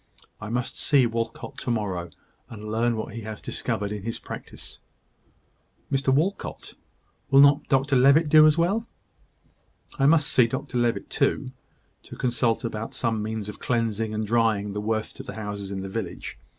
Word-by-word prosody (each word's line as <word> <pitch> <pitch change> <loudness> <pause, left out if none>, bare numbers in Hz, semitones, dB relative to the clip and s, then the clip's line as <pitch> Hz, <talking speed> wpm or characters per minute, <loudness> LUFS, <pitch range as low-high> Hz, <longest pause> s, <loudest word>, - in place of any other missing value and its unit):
I 105 - -6
must 120 +1 -3
see 140 -4 +4
Walcot 115 0 -4
to - - -4
morrow; 95 -7 -2 0.4
and 105 -1 -7
learn 115 +1 +1
what 110 - -5
he 115 - -6
has 110 -1 -7
discovered 105 -4 -3
in 105 -1 -4
his 115 +3 -4
practice." - - -9 1.1
"Mr 135 -1 +2
Walcot! 165 +9 -1 0.6
Will 135 0 +6
not 140 +1 +5
Dr 135 0 +2
Levitt 140 +5 +5
do 155 +1 +8
as 155 +1 +3
well?" 200 +7 +1 1.1
"I 135 - +4
must 155 -1 +4
see 125 -2 +4
Dr 125 0 -3
Levitt 120 -1 0
too, 130 -2 0 0.5
to - - -11
consult 120 -1 0
about 115 -1 -4
some 115 -3 0
means 110 -1 -4
of 105 - -8
cleansing 115 -2 -1
and 110 0 -2
drying 110 -2 +1
the 105 - -3
worst 110 0 -2
of - - -8
the - - -6
houses 105 -2 -5
in 100 -1 -4
the 95 - -5
village. 95 - -5
115 Hz, 170 wpm, -25 LUFS, 105-135 Hz, 1.1 s, do